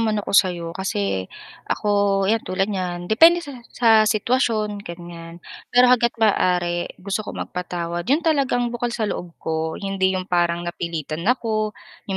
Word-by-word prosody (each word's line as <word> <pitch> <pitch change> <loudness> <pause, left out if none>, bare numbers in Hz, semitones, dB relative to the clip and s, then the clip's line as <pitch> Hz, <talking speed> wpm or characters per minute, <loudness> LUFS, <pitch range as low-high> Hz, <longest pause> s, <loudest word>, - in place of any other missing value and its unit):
naman 220 -1 +1
ako 205 - -5
sayo, 175 -4 +3
kasi 100 - -2 0.4
ako 200 -1 +1
yan 225 +3 +2
tulad 190 +1 -1
niyan, 180 -2 -3
depende 330 - +6
sa 285 - -8 0.2
sa 235 -2 +1 0.2
sitwasyon 215 -2 0
ganyan. 170 -2 -9 0.3
Pero 245 +1 +6
hangga't 235 -1 +2
maaari 180 -5 +1
gusto 195 +3 -3
ko - - -7
magpatawad 175 -1 -4
yun 290 +6 +2
talagang 265 -6 +1
bukal 240 0 -1
sa 235 -2 -2
loob 175 -4 -5
ko, 160 0 -3
hindi 190 -1 0
yung 185 - -3
parang 175 -1 0
napilitan 165 -3 -4
ako, 215 -4 0 0.3
yung 190 - -1
195 Hz, 155 wpm, -22 LUFS, 175-225 Hz, 0.4 s, depende